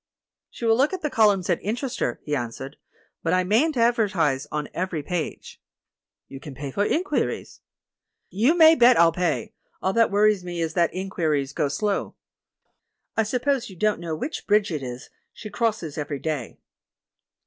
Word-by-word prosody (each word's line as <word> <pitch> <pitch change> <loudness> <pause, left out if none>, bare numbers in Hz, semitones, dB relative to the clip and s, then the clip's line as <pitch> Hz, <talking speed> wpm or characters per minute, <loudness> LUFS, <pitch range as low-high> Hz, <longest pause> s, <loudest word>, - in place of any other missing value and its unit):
"She 235 - -7
will 225 0 +4
look 275 +8 +2
at 370 - -5
the 300 - -1
columns 205 -5 +3
that 175 -2 0
interest 240 +5 -3
her," 120 - -1
he 150 - -2
answered, 130 +2 -5 0.4
"but 165 - 0
I 185 0 +3
mayn't 245 - +2
advertise 200 - +1
on 150 -1 -3
every 175 -4 -3
page." 175 0 -5 0.7
"You 135 - -9
can 140 -1 -10
pay 140 0 -6
for 200 - 0
inquiries." 355 - -1 0.7
"You 245 - +2
may 320 -1 +8
bet 245 -5 +6
I'll 170 0 +6
pay; 160 -9 -2 0.3
all 190 - -1
that 230 +1 +4
worries 205 -1 +3
me 175 -1 -5
is 165 -1 -2
that 170 -1 +2
inquiries 160 -7 -2
go 145 - 0
slow." 200 +8 -2 1.0
"I - - +3
suppose 250 +3 -1
you 190 - -11
don't 210 +2 +1
know 165 -2 -3
which 290 - -5
bridge 210 -2 +3
it 155 -3 -3
is 125 -1 -8 0.2
she 215 - -9
crosses 215 -10 -2
every 145 -1 -3
day?" 145 -5 -4
185 Hz, 170 wpm, -24 LUFS, 150-225 Hz, 1.0 s, may